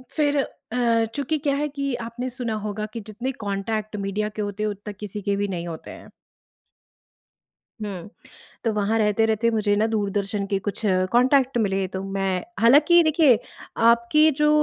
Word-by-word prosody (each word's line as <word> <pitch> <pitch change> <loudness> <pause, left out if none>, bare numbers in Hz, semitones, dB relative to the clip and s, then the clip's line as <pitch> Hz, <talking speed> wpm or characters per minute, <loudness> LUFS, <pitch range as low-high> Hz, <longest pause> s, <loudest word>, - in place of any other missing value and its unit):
फिर 290 -2 +2 0.4
अ, 230 -2 +2
चूँकि 285 +2 -1
क्या 280 -1 0
है 295 +1 0
कि 275 -2 -3
आपने 245 +2 -5
सुना 245 -3 -4
होगा 210 0 -3
कि 230 - -4
जितने 240 +5 -4
कॉन्टैक्ट 210 +2 -3
मीडिया 200 +2 -2
के 215 0 -6
होते 205 0 -3
हैं 215 - +1
उतना 205 +1 -7
किसी 210 0 -6
के 200 +1 0
भी 205 0 -1
नहीं 175 -2 -4
होते 160 -2 -7
हैं। - - -12 1.7
हुँ, 195 -2 -5 0.6
तो 230 - +1
वहाँ 210 +2 +1
रहते-रहते 220 +2 +2
मुझे 210 -2 +1
ना 215 +2 +2
दूरदर्शन 205 -2 -1
के 195 - +2
कुछ 205 +2 -4 0.3
कॉन्टैक्ट 260 +1 +3
मिले, 195 -3 +1
तो 190 +1 -5
मैं 195 -1 -1 0.2
हालाँकि 295 +9 +6
देखिए, 310 -6 +5 0.4
आपकी 235 +7 +4
जो 300 0 +3
220 Hz, 165 wpm, -24 LUFS, 200-250 Hz, 1.7 s, हालाँकि